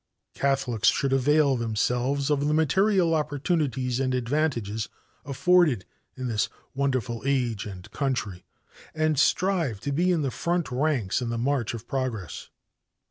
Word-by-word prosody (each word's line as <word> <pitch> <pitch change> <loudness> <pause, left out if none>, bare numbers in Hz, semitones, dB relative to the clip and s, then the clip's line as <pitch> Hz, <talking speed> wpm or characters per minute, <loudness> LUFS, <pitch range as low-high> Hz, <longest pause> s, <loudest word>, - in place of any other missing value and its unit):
Catholics 135 -5 0
should 135 -1 +2
avail 140 +1 +3
themselves 125 +5 0
of 145 0 +1
the 150 - +2
material 185 +2 +3
opportunities 145 -4 0
and 130 -1 0
advantages 120 -5 -1 0.4
offered 150 - +3 0.3
in 130 -1 -3
this 110 -3 0 0.2
wonderful 130 -4 -1
age 125 -7 0
and 95 -3 -10
country, 110 -10 -2 0.5
and 155 -2 +1
strive 170 - +1
to 140 - -3
be 175 +6 +2
in 165 -4 +1
the 135 - -1
front 170 0 -1
ranks 125 -6 0
in 120 - -2
the 115 - -2
march 125 -1 0
of 115 0 -9
progress. 120 - -4
135 Hz, 135 wpm, -26 LUFS, 120-150 Hz, 0.5 s, avail